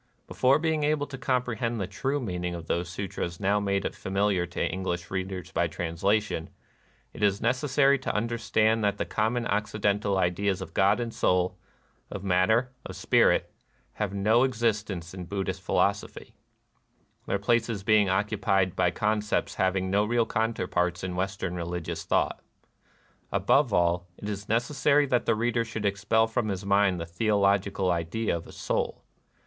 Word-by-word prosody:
Before 130 +2 +3
being 160 -1 0
able 150 -1 +1
to 145 - -8
comprehend 125 -3 -1
the 95 - -1
true 135 +9 -2
meaning 90 -7 -3
of 85 -1 -7
those 85 +2 -2
sutras 90 -2 -4
now 100 +1 +2
made 100 -1 -1
familiar 95 -2 0
to 85 - -2
English 90 -2 -4
readers 95 -2 -4
by 85 - +1
translation, 85 +2 -1 0.6
it - - -10
is 100 -1 +2
neces 130 +5 0
sary 140 +1 +4
to 130 - -3
understand 110 0 +1
that 100 -1 +1
the - - -2
common 115 +2 0
Occiden 105 0 0
tal 100 -2 0
ideas 95 +2 0
of - - -8
God 100 +4 +3
and 115 -1 -3
Soul, 90 0 +1 0.5
of 100 - -6
matter, 110 +7 +2
of - - -8
spirit, - - +2 0.4
have 105 -3 -2
no 105 +4 +3
existence 105 -8 -1
in 90 -2 -7
Buddhist 95 +1 -3
philosophy; - - -1 0.9
their - - +1
places 115 0 0
being 105 -2 +4
occupied 95 -1 +1
by 90 -1 +3
concepts 105 0 -1
hav 95 -2 +1
ing 95 0 -1
no 100 +1 +3
real 115 +2 +1
counterparts 90 -6 -1
in 90 -1 -3
Western 95 -1 -2
religious 85 -1 -4
thought. - - +1 0.9
Above 140 -4 +3
all, 90 -1 +1
it 105 - -7
is 100 -1 -5
necessary 140 +5 +2
that 125 -3 0
the 115 - +3
reader 115 +1 0
should 110 -2 -5
expel 105 +3 +2
from 110 0 -1
his 95 0 -4
mind 100 -2 +3
the 85 - -4
theolo 100 +3 +2
gical 95 -1 -2
idea 85 +5 -1
of 85 - -7
Soul. - - -2
100 Hz, 160 wpm, -27 LUFS, 90-115 Hz, 0.9 s, sary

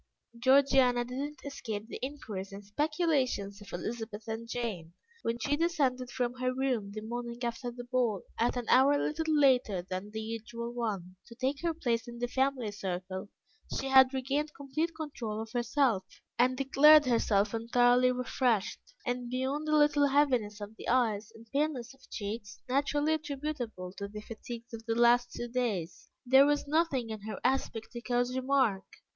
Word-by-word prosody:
Georgiana 260 -1 +4
did 250 +2 -5
not 290 +1 -5
escape 220 -6 -5
the - - -7
inquiries 215 -9 -5
and 200 +1 -9
speculations 265 - 0
of 205 - -12
Elizabeth 220 +3 -5
and 225 +1 -5
Jane. 200 -10 -4 0.3
When 230 +1 -1
she 285 +5 0
descended 285 -6 0
from 245 -1 -1
her 255 0 +1
room 255 -6 -1
the 215 +1 -6
morning 235 +1 -5
after 240 +1 -3
the 245 0 -8
ball, 240 -5 0 0.2
at 240 +2 +1
an 245 - -3
hour 275 +3 +5
little 315 +2 -1
later 255 - +3
than 185 +1 -4
her 220 - -6
usual 230 +2 -5
one, 200 -7 -3
to 235 - -12
take 265 +3 -1
her 335 -1 0
place 240 -6 -1
in 240 0 -8
the 245 +1 -1
family 260 -3 0
circle, 190 -1 -5 0.5
she 270 - -3
had 265 -1 +7
regained 280 +3 -2
complete 285 +4 -2
control 260 -9 -5
of 225 0 -6
herself, 240 -3 +1 0.4
and 255 +1 +3
declared 295 +3 +7
herself 225 -4 +2
entirely 245 +2 +4
refreshed, 250 -4 0 0.2
and 245 -1 -2
beyond 265 +5 -2
a 305 - +4
little 295 -1 +4
heaviness 255 -7 +2
of 210 +1 -8
the - - -9
eyes 225 -4 +1
and 225 - -14
paleness 275 -4 -1
of 270 - -21
cheeks, 205 -1 -5
naturally 290 +3 +1
attributable 280 - -4
to 200 0 -5
the 210 +1 -8
fatigues 230 +2 -9
of 225 0 -7
the 225 - +1
last 240 +1 +4
two 240 - -5
days, 230 -9 -3 0.2
there 265 +3 +7
was 290 0 +1
nothing 285 -7 +1
in 215 -1 -6
her 215 +1 -6
aspect 250 -4 -1
to 240 - -7
cause 245 +1 0
remark. 260 -7 +2
245 Hz, 170 wpm, -31 LUFS, 220-270 Hz, 0.5 s, had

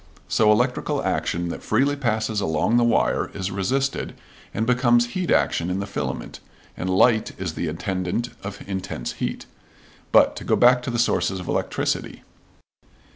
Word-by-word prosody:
So 105 -1 +4
electrical 125 +4 +1
action 85 0 -1
that - - -5
freely 135 +6 +1
passes 110 -5 -1
along 80 +8 +1
the 120 - +4
wire, 120 - +2
is 95 -1 -3
resisted 130 +9 -1 0.4
and 110 - -1
becomes 120 -1 +3
heat 185 -2 -2
action 85 - +2
in 90 +1 -1
the 100 - -2
filament, 100 - -5 0.4
and 90 - -3
light 110 +4 +3
is 90 -4 -3
the 85 - -3
attendant 95 +7 -2
of 100 0 -8
intense 95 -10 -4
heat. - - -3 0.7
But, - - +5
to - - -6
go - - +2
back 125 0 +5
to 125 - -4
the 120 - -2
sources 105 -5 +1
of 90 - -8
electricity. - - -2
110 Hz, 160 wpm, -23 LUFS, 95-120 Hz, 0.7 s, But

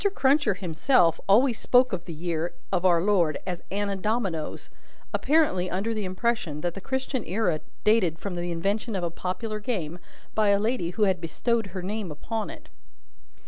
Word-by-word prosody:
Cruncher 275 -6 +3
himself 170 - +2
always 235 +4 +5
spoke 250 -2 +4
of 175 -2 -3
the 170 - -6
year 165 0 -2 0.2
of 185 -1 +1
our 170 -2 +5
Lord 180 -7 +3
as 180 -2 -4
Anna 200 0 -1
Dominoes: 195 -6 -2 0.4
apparently 280 - +2
under 200 +6 -1
the 215 -2 -2
impression 185 -5 -1
that 175 0 -1
the 195 - -8
Christian 265 +1 -2
era 180 -5 0 0.2
dated 205 -7 +3
from 200 +2 -5
the 175 0 -3
invention 200 +6 -1
of 185 - -2
a 170 - -1
popular 200 +5 -3
game, 180 -7 -3 0.3
by 215 -1 +3
a 200 0 +4
lady 220 -5 0
who 195 +5 0
had 190 -3 +2
bestowed 225 +7 0
her 185 -1 -6
name 205 0 -3
upon 215 +8 -4
it.) - - -11
195 Hz, 175 wpm, -26 LUFS, 175-225 Hz, 0.4 s, always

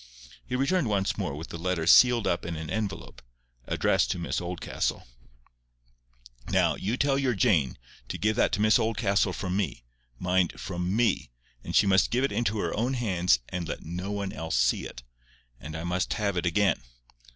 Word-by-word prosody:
He 125 - -2
returned 140 +3 +1
once 100 -2 0
more 70 - -3
with 80 +3 -8
the 85 - -7
letter 90 -1 -1
sealed 120 +6 +6
up 85 - 0
in 85 -1 -4
an 80 -1 -6
envelope, 110 -3 -4 0.5
addressed - - +2
to 90 - -1
Miss 85 0 -2
Oldcastle. 90 0 -3 1.4
"Now, - - +3
you 110 +6 -2
tell 140 0 +2
your 130 -4 +1
Jane 90 - +2 0.3
to - - -4
give 105 +1 +1
that - - +2
to - - +1
Miss 110 +2 +5
Oldcastle 105 -3 +1
from 90 +1 -3
me—mind, 60 +2 -2
from 90 +1 -3
ME; 105 - +1 0.3
and - - -5
she - - +6
must 95 0 +4
give 125 +3 +1
it 135 - +1
into 115 -2 0
her - - -2
own 125 +5 0
hands, 90 - +2
and 90 -3 -4
let - - -5
no 90 +5 -5
one 100 -1 -3
else 80 -3 -3
see - - +2
it. - - -11 0.6
And 75 +1 -8
I 80 - -5
must 90 +2 -1
have 100 -2 -1
it 90 0 0
again. 100 +4 +2
95 Hz, 185 wpm, -27 LUFS, 85-110 Hz, 1.4 s, sealed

